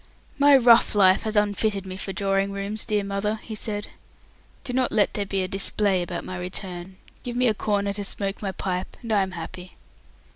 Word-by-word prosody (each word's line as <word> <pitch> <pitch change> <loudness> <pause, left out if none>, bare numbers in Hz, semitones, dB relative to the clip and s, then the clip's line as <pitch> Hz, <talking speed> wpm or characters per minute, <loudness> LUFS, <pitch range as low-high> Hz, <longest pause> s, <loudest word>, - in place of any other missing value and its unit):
"My 285 -1 +7
rough 235 -3 +5
life 190 -2 +5
has 220 -1 -3
unfitted 205 -1 +1
me 185 0 -6
for 190 +1 -5
drawing 195 0 0
rooms, 200 +2 -3
dear 210 -2 +1
mother," 200 +2 -1
he 225 - -7
said. 210 -1 -4 0.7
"Do 250 - -4
not 255 0 +1
let 215 -2 +2
there 205 -1 -2
be 195 -1 0
a - - -2
display 195 0 +1
about 175 0 -4
my 185 -1 -5
return. 180 0 -6 0.2
Give 240 -1 -5
me 250 0 +3
a 220 - +3
corner 200 -1 -1
to 205 0 -3
smoke 195 0 -3
my 200 -2 -2
pipe, 185 -1 -4
and 230 - -5
I 205 - +4
am 190 -1 -2
happy." 180 +1 -8
200 Hz, 205 wpm, -25 LUFS, 190-215 Hz, 0.7 s, My